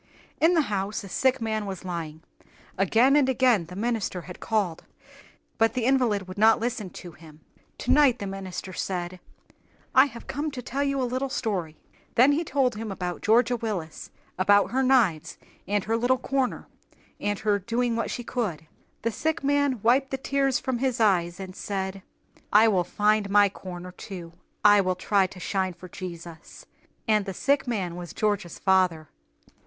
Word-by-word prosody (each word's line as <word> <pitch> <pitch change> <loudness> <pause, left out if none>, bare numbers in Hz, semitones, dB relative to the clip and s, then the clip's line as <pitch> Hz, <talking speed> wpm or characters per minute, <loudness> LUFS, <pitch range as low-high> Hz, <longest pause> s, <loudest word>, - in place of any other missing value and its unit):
In 335 +3 +4
the 325 - +5
house 205 -5 -3
a - - -8
sick 260 +7 +1
man 220 -2 -2
was 190 -1 -6
lying. 165 -3 -5 0.5
Again 225 +8 +4
and 280 -3 +4
again 250 -9 +3
the 180 - -10
minister 220 -4 -2
had 180 +1 -11
called, 200 -7 -1 0.8
but 225 0 +3
the 245 -3 0
invalid 240 -7 +2
would 185 +2 -8
not 225 +1 +5
listen 225 -4 -3
to 175 0 -10
him. 155 -1 -16 0.4
Tonight 285 -5 +4
the 205 - -5
minister 195 -1 -6
said, 180 -1 -4 0.7
"I 260 +1 +7
have 240 -4 -9
come 295 +4 -3
to 255 - -5
tell 275 +4 -2
you 275 -1 0
a - - 0
little 255 +2 -2
story." 180 -11 -3 0.4
Then 255 +4 +6
he 305 +4 +1
told 270 -5 +1
him 215 -1 -5
about 180 -2 -4
Georgia 235 +3 +3
Willis, 205 -9 -5 0.3
about 205 +2 +4
her 260 +2 +1
knives 240 - +2 0.3
and 205 -1 0
her 225 +2 0
little 245 +3 +2
corner, 265 -1 -2 0.5
and 205 0 -1
her 210 -1 +1
"doing 235 +4 -1
what 230 - -2
she 245 - -4
could." 205 - -3 0.4
The 230 - 0
sick 315 +6 -2
man 285 -4 +1
wiped 260 +4 +3
the 270 - -2
tears 270 -1 +1
from 250 -1 -2
his 255 -2 0
eyes, 180 -5 +2
and 185 -1 -8
said, 195 -1 -4 0.5
"I 215 +2 +6
will 190 -5 +2
find 210 +3 +1
my 205 0 +5
corner, 180 -2 -9
too. 180 -2 -9 0.3
I 205 -1 +7
will 185 -1 0
try 195 +1 +2
to 180 - -13
shine 190 0 -1
for 185 - -11
Jesus." 170 -2 -9 0.4
And 215 -2 +3
the 190 - -4
sick 275 -1 +1
man 190 -8 -2
was 175 -1 -8
Georgia's 205 -5 -1
father. 185 -5 +2
210 Hz, 175 wpm, -26 LUFS, 185-250 Hz, 0.8 s, I